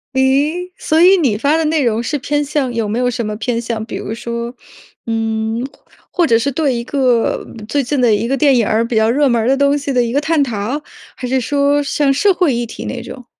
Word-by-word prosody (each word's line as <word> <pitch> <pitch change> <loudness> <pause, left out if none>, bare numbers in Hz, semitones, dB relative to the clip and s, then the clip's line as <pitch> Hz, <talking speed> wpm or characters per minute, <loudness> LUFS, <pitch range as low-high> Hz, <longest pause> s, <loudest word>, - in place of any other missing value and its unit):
咦， 290 +7 +1
所 315 +1 +1
以 375 +2 +7
你 265 -11 +1
发 285 +8 +1
的 325 - 0
内 305 -1 +1
容 230 -2 +1
是 295 +4 -2
偏 290 +2 -1
向 280 -3 -1
有 230 -3 -2
没 220 +4 -2
有 250 - +1
什 235 -1 -3
么 210 0 -3
偏 230 +1 -2
向？ 230 -2 -3
比 225 - -7
如 220 - -5
说， 235 +1 -5 0.5
嗯， 225 +1 -1 0.5
或 345 -3 +2
者 230 - +4
是 275 +5 -1
对 285 0 0
一 235 - -3
个 250 -3 +1 0.2
最 285 +4 0
近 270 +2 -1
的 240 -3 +4
一 215 +3 0
个 270 +2 0
电 280 -2 +4
影 230 -4 +2
儿、 225 +2 +1
比 230 - -3
较 220 0 +3
热 285 +4 +3
门 235 -3 +2
儿 220 - -1
的 270 +1 +3
东 280 +1 +3
西 285 -1 -3
的 250 -2 +2
一 235 0 -3
个 285 - +2
探 315 -2 +2
讨， 240 +3 -3 0.4
还 250 - -5
是 260 +1 0
说 285 +3 +1
像 280 0 +1
社 395 +9 +3
会 350 -6 +2
议 240 0 -1
题 - - -8
那 - - -4
种？ 250 -2 -10
255 Hz, 265 characters per minute, -17 LUFS, 230-290 Hz, 0.5 s, 以